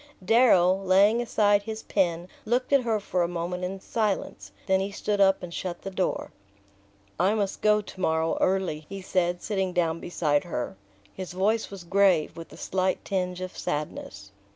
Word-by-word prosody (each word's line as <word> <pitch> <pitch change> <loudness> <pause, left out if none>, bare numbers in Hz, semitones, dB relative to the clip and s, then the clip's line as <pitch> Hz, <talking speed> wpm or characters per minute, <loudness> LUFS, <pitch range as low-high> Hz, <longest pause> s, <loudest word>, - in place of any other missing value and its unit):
Darrow, 190 -5 +5
laying 200 +5 +4
aside 205 -3 +3
his 220 +1 -6
pen, 175 -3 0 0.2
looked 250 +4 0
at 275 - +6
her 225 -3 0
for 185 -3 -1
a 170 - +2
moment 175 +1 -4
in 190 +2 -3
silence; 195 - -2
then 190 0 +3
he 195 +1 -2
stood 205 0 -1
up 195 -1 +4
and 175 -1 -7
shut 175 -1 -5
the 195 - -5
door. 185 -1 -2 0.9
"I 190 +5 +3
must 200 -3 -2
go 210 0 +4
to 190 -2 -11
morrow 160 -1 +1
early," 185 -5 0
he 195 -1 -7
said, 175 -2 0
sitting 190 -3 -1
down 165 -2 0
beside 150 -5 0
her. 125 - -4 0.4
His 185 -2 -7
voice 210 +5 +1
was 195 -3 -9
grave, 185 -3 +3
with 165 0 -10
a - - -12
slight 185 0 -1
tinge 180 -2 -2
of 185 0 -6
sadness. 100 -9 -5
185 Hz, 175 wpm, -26 LUFS, 175-205 Hz, 0.9 s, at